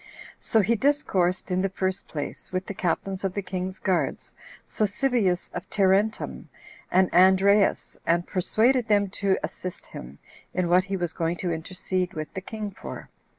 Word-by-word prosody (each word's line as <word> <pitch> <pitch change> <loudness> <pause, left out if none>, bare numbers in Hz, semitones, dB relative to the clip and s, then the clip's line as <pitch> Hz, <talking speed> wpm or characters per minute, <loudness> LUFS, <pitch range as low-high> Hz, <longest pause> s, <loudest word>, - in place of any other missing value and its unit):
So 220 - +2
he 210 +4 +2
discoursed, 200 -9 +1
in 180 0 +2
the 195 - +1
first 190 0 -2
place, 145 -2 -6
with 185 0 -2
the - - -5
captains 190 +1 -2
of 190 -1 -2
the 200 - -2
king's 185 0 -4
guards, 185 -3 -1 0.3
Sosibius 215 -3 0
of - - -6
Tarentum, 200 +2 +1 0.4
and 185 0 +3
Andreas, 190 +3 +4
and 170 +1 +1
persuaded 230 +6 +2
them 205 -2 +2
to 195 -1 +3
assist 185 -1 -6
him 65 +3 -10 0.4
in 180 -1 +1
what 180 +1 +4
he 195 -1 -2
was 175 -3 -2
going 165 +1 -1
to 175 - +1
intercede 180 +2 -3
with 155 -1 -5
the 190 - -4
king 210 +1 -5
for. - - -9
190 Hz, 160 wpm, -26 LUFS, 180-200 Hz, 0.4 s, Andreas